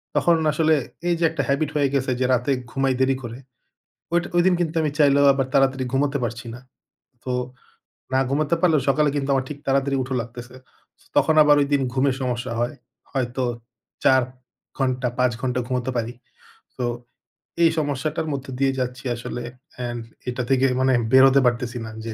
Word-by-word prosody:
তখন 170 - +4 0.2
আসলে 155 +1 +3 0.3
এই 175 - +2
যে - - 0
একটা 160 -2 -2
habit 140 +2 +1
হয়ে 145 -2 +2
গেছে 135 -1 0
যে 130 - +1
রাতে 125 +3 +1 0.2
ঘুমাই 135 -1 +1
দেরি 130 0 +3
করে। 120 0 -7 0.8
ওইটা 175 0 +1
ওইদিন 180 +1 +4
কিন্তু 165 -2 -1
আমি 155 - 0
চাইলেও 140 -1 +5
আবার 135 -1 -1
তাড়াতাড়ি 135 -1 +2
ঘুমাতে 140 +1 +1
পারছি 120 +1 -5
না। 120 - -10 0.6
তো 130 - -3 0.8
না 130 - +4
ঘুমাতে 150 +4 +1
পারলেও 160 -5 +3
সকালে 150 +2 +3
কিন্তু 140 -1 -2
আমার 135 -1 0
ঠিক 150 - -6
তাড়াতাড়ি 135 0 +1
উঠা 130 +1 -5
লাগতেছে। 120 +1 -10 0.5
সো - - -25
তখন 160 - +4
আবার 150 0 +6
ওইদিন 140 0 +1
ঘুমের 135 0 +1
সমস্যা 125 -1 -2
হয়। 120 +5 -1 0.4
হয়তো 130 -1 -2 0.6
৪ 130 0 +6 0.6
ঘন্টা 130 -2 0
৫ 125 -1 +3
ঘন্টা 125 -1 -1
ঘুমাতে 125 0 -2
পারি। 115 +1 -2 0.6
তো 125 - -1 0.8
এই 165 - +7
সমস্যাটার 155 +2 -2
মধ্যে 135 -1 -5
দিয়ে 135 -1 +3
যাচ্ছি 125 0 -3
আসলে। 120 +1 -6 0.3
অ্যান্ড 120 -1 -4 0.3
এটা 125 0 -2
থেকে 135 0 +3
মানে 130 0 +3 0.2
বেরোতে 135 +1 +7
পারতেছি 120 0 0
না - - -7 0.2
যে 115 - -4
135 Hz, 170 wpm, -23 LUFS, 125-145 Hz, 0.8 s, এই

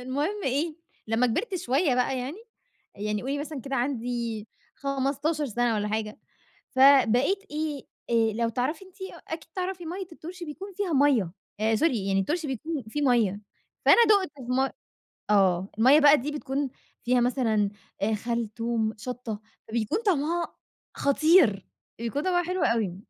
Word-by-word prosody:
المهم 295 +11 -2
إيه، 300 +5 0 0.3
لمّا 225 +3 +2
كبِرت 380 - -1
شوية 300 -4 +1
بقى 250 +1 +1
يعني، 275 +10 -5 0.6
يعني 210 0 -2
قولي 275 +3 -2
مثلًا 295 -2 -5
كده 270 +2 -3
عندي 240 -4 -2 0.3
15 280 +2 -1
سنة 240 0 0
والّا 210 0 -1
حاجة، 215 0 -3 0.5
فبقيت 270 - +5
إيه 300 -3 -3 0.3
آآ، 225 -2 +3
لو 230 +1 0
تعرفي 280 - -2
أنتِ 375 0 -19
أ 380 - -7
أكيد 320 0 -7
تعرفي 365 -1 -3
مَيّة 365 +2 -5
الطُرشي 345 +2 -8
بيكون 385 +6 -8
فيها 375 -4 -2
مَيّة، 265 -11 +3 0.3
آآ 220 +1 +2
sorry 215 - -1
يعني 195 -2 0
الطُرشي 310 - -1
بيكون 280 +3 -3
فيه 295 +6 -2
مَيّة، 225 -7 +2 0.4
فأنا 475 - +8
دوقت 400 -6 +4
في - - -10
م 265 +1 +2 0.6
آه 190 -2 +3
المَيّة 265 +7 +7
بقى 290 0 +7
دي 290 +4 -3
بتكون 285 -1 -2 0.3
فيها 245 0 +3
مثلًا 225 -5 +1 0.3
آآ 220 +2 +1
خل، 235 +1 -2
توم، 230 -2 -1
شَطة، 230 -2 -5 0.3
فبيكون 230 - 0
طعمها 340 -1 0 0.4
خطير، 280 - +4 0.3
بيكون 235 +5 -2
طعمها 355 -1 +2
حلو 365 0 -1
أوي، 210 -6 +1
265 Hz, 155 wpm, -27 LUFS, 225-315 Hz, 0.6 s, فأنا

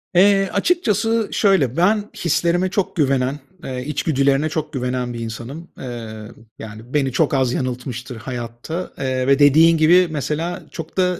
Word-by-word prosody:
Eee, 195 +1 +5
açıkçası 225 - +1
şöyle, 165 - +2
ben 205 +4 +3
hislerime 170 +2 +1
çok 195 0 -2
güvenen, 135 -2 +1 0.2
eee, 130 0 -5
içgüdülerine 140 0 +1
çok 155 0 -4
güvenen 125 -1 -2
bir 115 - -6
insanım. 120 +9 -7
Eee, 115 -3 -7 0.3
yani, 110 +4 -10
beni 135 -3 +1
çok 150 +2 +1
az 130 -2 +1
yanıltmıştır 125 0 -4
hayatta, 120 +8 -6
eee, 130 -1 -1
ve 140 +1 +4
dediğin 160 +3 +6
gibi, 175 +3 +5
mesela 155 +4 -3
çok 165 +2 -8
da 180 -1 +1
145 Hz, 145 wpm, -20 LUFS, 125-175 Hz, 0.3 s, dediğin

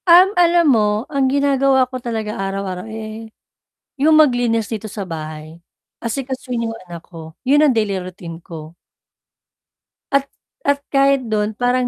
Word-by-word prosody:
Um, 360 +3 +8
alam 340 0 +4
mo 210 0 +1
ang 275 -1 +2
ginagawa 275 -1 +3
ko 255 0 -7
talaga 220 -3 -3
araw-araw 195 0 -4
eh, 220 0 -7 0.7
yung 310 +3 +4
maglinis 245 -6 +3
dito 215 -1 -5
sa 200 -2 -5
bahay, 155 0 -8 0.4
asikasuhin 250 -1 -3
yung 225 - -4
anak 170 -2 -10
ko, 160 -2 -11
yun 290 +3 +5
ang 300 - +5
daily 215 -5 0
routine 175 -2 -9
ko. 160 0 -10 1.4
At 275 0 +2 0.4
at 285 0 +3
kahit 275 -1 +3
dun 210 0 0
parang 245 +1 +1
225 Hz, 140 wpm, -19 LUFS, 195-270 Hz, 1.4 s, Um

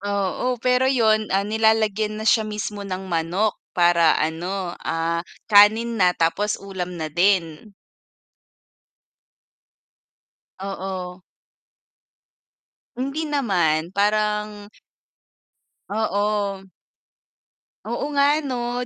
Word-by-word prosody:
Oo, 200 +5 -1 0.2
pero 250 +1 +3
'yon, 220 -5 +2
ah, 195 - +2
nilalagyan 215 0 +1
na - - -5
siya 220 -2 +2
mismo 210 -1 -5
ng 185 0 -4
manok, 175 +6 0 0.2
para, 175 -1 +4 0.2
ano, 165 +5 -3 0.2
ah, 165 +1 -1 0.3
kanin 220 +3 +5
na 180 - +5
tapos 205 +6 +1
ulam 185 -2 -6
na 160 - -2
din. 180 +2 0 2.8
Oo. 190 -2 -6 1.7
Hindi 275 +5 -3
naman, 180 - 0
parang 210 0 0 1.2
Oo. 205 -1 -1 1.2
Oo - - -3
nga, 280 0 +4 0.2
'no, 245 -1 -3
205 Hz, 85 wpm, -22 LUFS, 180-220 Hz, 2.8 s, kanin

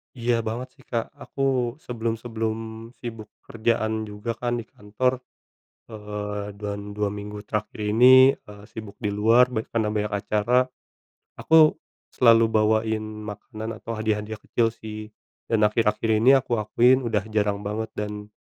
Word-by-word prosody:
Iya, 120 -1 +1
banget 115 +4 -3
sih, - - -19
Kak. 115 -2 -2
Aku 130 -4 -1
sebelum-sebelum 115 -1 -4
sibuk 115 -3 -7 0.2
kerjaan 110 -1 -1
juga 105 +3 -5
kan 120 -1 -1
di - - -10
kantor, 125 +6 -2 0.7
eee, 105 -1 -5
dan 100 0 -5
2 105 0 -1
minggu 105 +1 -7
terakhir 105 0 -4
ini, 125 +5 +6
eee, 105 0 -14
sibuk 110 -2 -9
di 105 - -1
luar 115 +5 +4
ban 110 -3 -3
karena 110 -2 +1
banyak 105 0 -2
acara. 105 +5 +1 0.7
Aku 160 -1 +5 0.3
selalu 115 -2 +5
bawain 110 0 +2 0.2
makanan 110 +2 -7
atau 115 - -5
hadiah-hadiah 110 0 -2
kecil 115 -1 +1
sih, 110 -1 -9 0.3
dan 110 -2 +2
akhir-akhir 105 +1 +1
ini 125 +4 +6
aku 120 -3 0
akuin 120 +4 +4
udah 110 -3 0
jarang 105 -1 0
banget 105 +2 -3
dan 105 0 -5
110 Hz, 140 wpm, -24 LUFS, 105-115 Hz, 0.7 s, ini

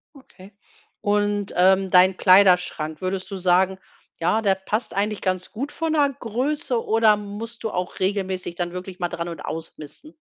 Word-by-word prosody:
Okay 205 -8 -16 0.5
und, 205 0 0
ähm, 190 +1 +4
dein 185 +1 +5
Kleiderschrank, 180 -5 +4
würdest 190 +1 -3
du 195 - -4
sagen: 185 +1 +2 0.4
„Ja 195 +7 +1
der 195 -3 +2
passt 215 +4 -3
eigentlich 205 +1 -1
ganz 185 -1 -2
gut 275 +7 -5
von 325 -1 -2
der 290 -2 +3
Größe." 245 +1 -1
Oder 220 -1 +4
musst 210 +3 -8
du 220 - -1
auch 180 0 -4
regelmäßig 190 -2 -2
dann 175 0 -3
wirklich 185 +1 -7
mal 175 - 0
dran 170 +1 -4
und 165 -3 -7
ausmisten? 160 - -7
190 Hz, 165 wpm, -23 LUFS, 180-215 Hz, 0.5 s, dein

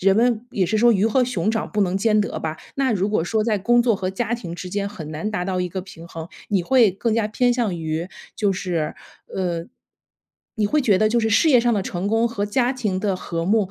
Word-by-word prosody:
人 195 +1 +4
们 235 +1 +2
也 190 -7 0
是 215 - 0
说 235 +2 +5
鱼 205 0 +2
和 250 +3 +3
熊 215 -5 -1
掌 225 0 -2
不 210 - 0
能 190 -2 +1
兼 215 +1 +3
得 205 - -2
吧。 160 0 -4 0.2
那 270 -3 +1
如 200 -1 0
果 205 -6 0
说 220 +4 0
在 215 -1 +1
工 240 +5 +3
作 235 -3 +2
和 185 -1 -2
家 230 +4 -2
庭 180 -8 -6
之 180 +1 -7
间 200 +2 -2
很 170 -7 -7
难 160 +8 -3
达 180 -4 -2
到 185 -1 -1
一 180 -1 -2
个 190 - -3
平 180 -3 -12
衡， 165 -1 -8 0.2
你 195 -3 +1
会 235 +2 +4
更 215 +4 -1
加 225 -2 +1
偏 245 +3 +1
向 230 -6 0
于， 160 0 -3 0.3
就 205 -2 +1
是， 175 -5 -2 0.4
呃 175 -3 -2 0.9
你 215 -2 +2
会 295 +8 +1
觉 205 -7 +3
得 215 - +3
就 235 +2 +2
是 225 -1 +1
事 270 +9 +4
业 260 -5 +6
上 240 0 +2
的 210 - +1
成 185 0 -3
功 225 +3 +2
和 220 -3 -2
家 245 +5 +1
庭 210 -7 -2
的 195 -2 0
和 170 -2 -4
睦， 205 -1 +2
205 Hz, 270 characters per minute, -22 LUFS, 185-230 Hz, 0.9 s, 业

